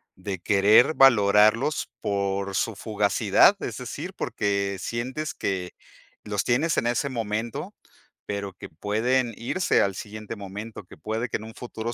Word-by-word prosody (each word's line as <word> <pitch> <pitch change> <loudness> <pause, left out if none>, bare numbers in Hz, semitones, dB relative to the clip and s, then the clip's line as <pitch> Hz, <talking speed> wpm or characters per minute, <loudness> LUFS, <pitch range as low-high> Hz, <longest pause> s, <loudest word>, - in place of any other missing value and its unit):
de 95 0 -5
querer 105 - +5
valorarlos 110 +1 +4
por 100 -1 -1
su 115 - 0
fugacidad, 105 -1 +3
es - - -4
decir, - - -6
porque 100 -1 -1
sientes 130 +9 -4
que 90 -2 -3 0.5
los 105 -2 -1
tienes 145 +7 +1
en 120 - +1
ese 120 +4 0
momento, 115 -1 -3 0.5
pero 100 -2 -4
que - - -10
pueden 115 +8 0
irse 170 +10 +1
al 100 -1 0
siguiente 110 +2 -7
momento, 105 +1 -8
que - - -15
puede 110 +3 -3
que - - -1
en 110 - -11
un 110 - -10
futuro 120 -1 -5
105 Hz, 145 wpm, -25 LUFS, 100-120 Hz, 0.5 s, querer